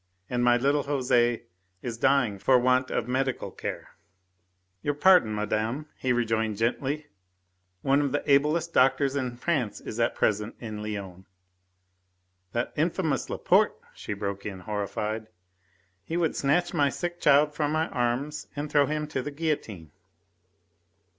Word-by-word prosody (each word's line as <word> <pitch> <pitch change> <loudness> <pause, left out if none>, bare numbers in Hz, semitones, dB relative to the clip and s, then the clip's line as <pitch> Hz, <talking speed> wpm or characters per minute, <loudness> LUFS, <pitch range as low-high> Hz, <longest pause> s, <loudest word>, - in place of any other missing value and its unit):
And 120 -1 +1
my 120 0 +5
little 140 +4 +2
Jose 125 -4 +1 0.4
is 115 -2 -5
dying 125 -8 +2
for 130 +6 +4
want 130 +1 +2
of 115 - -1
medical 130 0 -1
care." - - -6 0.9
"Your 145 +4 -1
pardon, 150 - +5
madame," 110 +7 -2
he 130 - -1
rejoined 110 -3 0
gently, 135 +6 -1 0.8
"one 140 +1 +3
of 140 -2 0
the 145 - -1
ablest 150 +4 +2
doctors 135 +1 +3
in 125 -3 -2
France 130 -7 -1
is 110 - -7
at 115 - +1
present 105 +1 0
in 110 -3 -6
Lyons 100 -3 -6 0.6
" 90 0 -47
"That 120 - -2
infamous 160 -3 0
Laporte," - - +2 0.2
she - - -5
broke 100 -1 -4
in, 95 -3 -6
horrified. 105 +2 -3 0.8
"He 165 - -3
would 170 -2 +1
snatch 160 +6 +1
my 145 -1 +3
sick 175 +5 -4
child 150 +1 +5
from 150 -1 -1
my 160 +1 +1
arms 130 +5 -2
and 145 +1 -4
throw 145 -1 +4
him 150 0 -1
to 130 - -2
the 145 - -4
guillotine." 140 - -3
130 Hz, 145 wpm, -27 LUFS, 110-145 Hz, 0.9 s, my